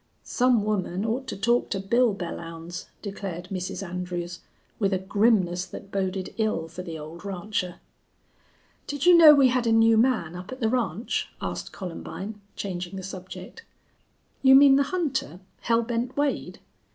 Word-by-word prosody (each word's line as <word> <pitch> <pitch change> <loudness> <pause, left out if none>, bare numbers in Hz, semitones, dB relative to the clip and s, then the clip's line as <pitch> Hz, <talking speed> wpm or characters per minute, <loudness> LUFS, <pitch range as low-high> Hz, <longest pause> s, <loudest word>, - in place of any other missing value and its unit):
"Some 245 -3 +2
woman 200 -2 -1
ought 250 +4 -2
to - - -5
talk 235 +5 +2
to 195 - -2
Bill 230 +3 +2
Belllounds," 170 -1 -7 0.2
declared 190 -3 -6
Mrs. 185 0 -4
Andrews 180 0 -5 0.4
with 200 -2 +1
a - - +2
grimness 190 -2 +2
that 195 - -10
boded 190 -1 -2
ill 215 -7 0
for 170 +3 -8
the 165 -3 -6
old 160 +3 -9
rancher. 195 -2 -3 1.1
"Did 285 +2 -3
you 355 0 +8
know 315 -3 +10
we 270 -2 +5
had 245 -1 +1
a - - +3
new 225 0 +5
man 220 -9 +1
up 180 +4 -8
at 255 - -7
the 225 -4 +1
ranch?" 230 -4 -1
asked - - -5
Columbine, 195 +3 -7
changing 180 -1 -5
the 190 - -6
subject. 185 - -9 0.8
"You 265 0 +7
mean 275 0 +8
the 280 - +4
hunter, 275 - -2 0.2
Hell 230 0 +2
Bent 240 +2 -3
Wade?" 290 -1 -1
200 Hz, 160 wpm, -26 LUFS, 180-240 Hz, 1.1 s, know